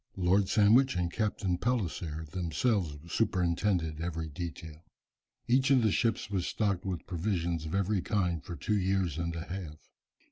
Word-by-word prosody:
Lord 95 +2 +3
Sandwich 115 +5 +5
and 90 -1 -1
Captain 100 -5 -1
Palliser 85 -10 -2
themselves 90 - 0 0.2
superintended 90 -5 +1
every 80 -2 -3
detail. 80 0 -7 0.6
Each 130 +2 +3
of 130 -4 +5
the 110 - +3
ships 115 +1 +1
was 95 -3 -1
stocked 100 -4 -1
with 90 -4 -3
provisions 85 -3 -2
of 80 - -3
every 100 0 +1
kind 90 - 0
for 85 - -6
two 105 +4 0
years 95 -4 0
and 85 0 -2
a 80 - -4
half. 85 -5 -8
90 Hz, 150 wpm, -30 LUFS, 85-105 Hz, 0.6 s, Sandwich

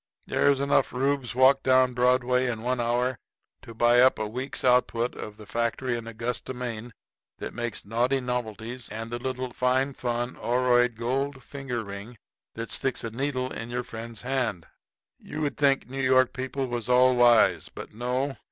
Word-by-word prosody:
There's 140 -1 +2
enough 140 0 +2
Reubs 135 -1 -1
walk 130 +1 +5
down 130 -1 +4
Broadway 125 +1 +2
in 115 -2 -3
one 125 +1 0
hour 120 +1 0 0.4
to 115 - -11
buy 120 +2 +5
up 130 +1 +5
a 110 - -2
week's 125 +5 -2
output 125 -1 +2
of 105 0 -8
the 105 - -11
factory 120 +3 -1
in 115 -1 -6
Augusta, 120 +3 -4
Maine, 120 -1 -5 0.5
that - - -6
makes 120 -2 -4
Knaughty 120 +6 +1
Knovelties 125 -1 -4
and 115 +2 -6
the 120 - -3
little 130 -1 -4
Phine 130 +2 +1
Phun 120 0 -3
oroide 125 -1 +2
gold 130 +3 -2
finger 135 -5 -5
ring 100 +4 -8 0.4
that 115 0 -5
sticks 135 -2 -1
a 115 - -4
needle 130 +1 -2
in 115 +1 -6
your 125 +1 -2
friend's 115 0 -7
hand. 125 -9 -1 0.5
You'd 150 -1 -3
think 140 -2 +2
New 135 +2 -4
York 130 -1 +4
people 130 +1 -3
was 120 -2 -4
all 125 0 +5
wise; 120 -2 +4
but - - -10
no. 125 +4 -2
125 Hz, 170 wpm, -27 LUFS, 115-130 Hz, 0.5 s, walk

